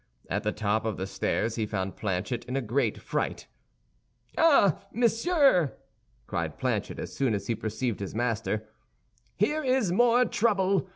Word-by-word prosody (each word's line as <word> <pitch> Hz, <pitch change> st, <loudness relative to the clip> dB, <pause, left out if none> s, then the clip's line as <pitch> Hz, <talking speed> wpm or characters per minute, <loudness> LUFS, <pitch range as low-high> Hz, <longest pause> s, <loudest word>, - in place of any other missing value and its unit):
At 100 Hz, -, 0 dB
the 105 Hz, -1 st, 0 dB
top 105 Hz, +1 st, 0 dB
of 110 Hz, -3 st, -2 dB
the 95 Hz, -, -3 dB
stairs 110 Hz, +3 st, -1 dB
he 110 Hz, -2 st, -1 dB
found 95 Hz, -2 st, -3 dB
Planchet 100 Hz, +4 st, -2 dB
in 125 Hz, -, -4 dB
a 135 Hz, -, +1 dB
great 120 Hz, 0 st, 0 dB
fright. -, -, -3 dB, 0.9 s
"Ah, 275 Hz, -, +4 dB
monsieur!" 235 Hz, -, +3 dB, 0.5 s
cried -, -, -3 dB
Planchet, -, -, -2 dB
as -, -, -6 dB
soon 130 Hz, -6 st, +1 dB
as 100 Hz, -, -4 dB
he 115 Hz, -, 0 dB
perceived 110 Hz, +1 st, -3 dB
his 100 Hz, 0 st, -5 dB
master, 110 Hz, -2 st, -1 dB, 0.7 s
"here 300 Hz, +10 st, +1 dB
is 255 Hz, -8 st, +2 dB
more 240 Hz, +5 st, +4 dB
trouble. 195 Hz, -5 st, +1 dB
125 Hz, 155 wpm, -28 LUFS, -, 0.9 s, Ah